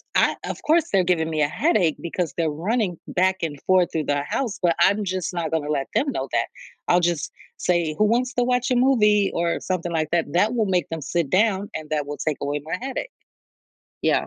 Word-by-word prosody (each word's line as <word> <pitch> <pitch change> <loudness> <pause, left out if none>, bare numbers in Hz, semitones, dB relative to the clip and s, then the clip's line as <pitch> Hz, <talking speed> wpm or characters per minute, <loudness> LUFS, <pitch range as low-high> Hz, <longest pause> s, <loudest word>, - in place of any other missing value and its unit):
I - - +3
of - - -5
course, 320 +1 +3
they're 190 -2 +4
giving 165 -3 +1
me 155 -1 -1
a 145 - +4
headache 180 - +2
because 170 -3 -3
they're 165 -2 +1
running 180 +4 -1
back 190 +1 +2
and 155 -3 -3
forth 185 -2 +3
through 160 -2 0
the 145 0 0
house, 235 - -3
but 175 -2 +3
I'm 205 +2 +4
just 185 -1 -2
not 170 -3 -2
gonna 155 -2 -1
let 140 -3 -1
them 280 0 +2
know 135 - -3
that. 115 -1 +1 0.4
I'll 175 - +5
just 175 -3 -1 0.3
say, 170 -4 0
"Who 215 - +3
wants 245 +4 +1
to 245 - +1
watch 250 +1 +1
a - - +3
movie?" 210 -6 +4
or 170 0 0
something 175 -2 -2
like 155 -2 0
that, 170 -1 +2
that 210 +7 +3
will 225 -3 +1
make 180 -6 0
them 165 -1 -4
sit 155 +1 -1
down 200 +1 +2
and 155 -1 -6
that 150 -2 0
will 145 0 -5
take 155 -2 -1
away 145 +1 -1
my 165 +3 -2
headache. 270 - -4 0.9
Yeah. - - +2
175 Hz, 225 wpm, -23 LUFS, 155-210 Hz, 0.9 s, I'll